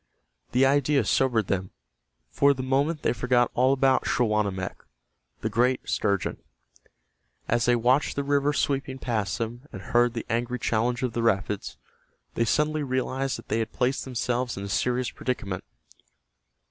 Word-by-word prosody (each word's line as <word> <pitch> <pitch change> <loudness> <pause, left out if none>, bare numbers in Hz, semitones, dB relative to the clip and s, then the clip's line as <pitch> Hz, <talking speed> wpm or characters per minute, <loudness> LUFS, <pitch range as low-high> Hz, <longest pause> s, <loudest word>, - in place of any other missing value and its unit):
The 130 +2 +4
idea 140 -2 +3
sobered 120 -2 +2
them. 95 -1 -2 0.6
For 140 0 +4
the 130 - -4
moment 140 +4 0
they - - +2
forgot 125 0 +2
all 130 +2 +3
about 135 -1 +2
Schawanammek, 105 -5 0 0.6
the - - -1
great 125 +4 +1
sturgeon. 100 -3 0 1.1
As 120 0 +1
they 120 - +4
watched 125 +5 +2
the 140 - -1
river 140 +1 +2
sweeping 135 -2 -1
past 110 -7 -2
them, 120 +4 -5
and 100 - -7
heard 120 0 +2
the 115 - -4
angry 120 +2 -1
challenge 120 +2 0
of 125 -3 -1
the 120 - -1
rapids, 105 -2 -1 0.6
they 115 - +1
suddenly 150 +5 +1
realized 130 0 -1
that - - -13
they 110 - +1
had 110 0 -3
placed 130 +2 0
themselves 125 -1 -2
in 100 - -5
a 100 - -5
serious 125 +3 0
predicament. 100 -7 -3
125 Hz, 155 wpm, -26 LUFS, 115-135 Hz, 1.1 s, The